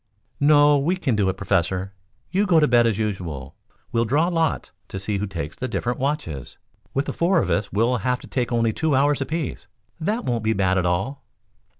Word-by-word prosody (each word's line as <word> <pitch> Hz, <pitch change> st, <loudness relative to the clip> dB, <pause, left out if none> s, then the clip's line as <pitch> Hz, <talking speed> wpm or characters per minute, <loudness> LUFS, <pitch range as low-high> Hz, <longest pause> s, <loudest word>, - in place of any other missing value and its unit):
"No; 145 Hz, 0 st, +5 dB
we 165 Hz, +7 st, +1 dB
can 145 Hz, -10 st, 0 dB
do 100 Hz, -2 st, +2 dB
it, 95 Hz, -, -3 dB
Professor. 95 Hz, 0 st, -1 dB, 0.4 s
You 200 Hz, +3 st, +1 dB
go 170 Hz, -3 st, +5 dB
to 150 Hz, -, +4 dB
bed 120 Hz, -1 st, +4 dB
as 110 Hz, -4 st, 0 dB
usual. 85 Hz, -11 st, -4 dB, 0.4 s
We'll 115 Hz, -, +2 dB
draw 150 Hz, +9 st, +2 dB
lots 165 Hz, -3 st, 0 dB, 0.2 s
to -, -, -6 dB
see 100 Hz, +1 st, -2 dB
who 105 Hz, -, -2 dB
takes 85 Hz, -5 st, -5 dB
the 130 Hz, -, -4 dB
different 120 Hz, -1 st, -2 dB
watches. 130 Hz, -, -3 dB, 0.4 s
With 135 Hz, +2 st, +1 dB
the -, -, -3 dB
four 170 Hz, +2 st, +2 dB
of -, -, -1 dB
us 100 Hz, -1 st, 0 dB
we'll 115 Hz, +5 st, +2 dB
have 125 Hz, +1 st, -1 dB
to -, -, -11 dB
take 125 Hz, -2 st, -2 dB
only 115 Hz, -2 st, +2 dB
two 160 Hz, +1 st, +1 dB
hours 140 Hz, +1 st, +2 dB
apiece. 155 Hz, +1 st, -3 dB, 0.3 s
That 215 Hz, +9 st, -1 dB
won't 120 Hz, -3 st, -1 dB
be 110 Hz, +1 st, +2 dB
bad 95 Hz, -2 st, +2 dB
at 90 Hz, -, 0 dB
all." 115 Hz, +11 st, -2 dB
120 Hz, 210 wpm, -23 LUFS, 100-145 Hz, 0.4 s, No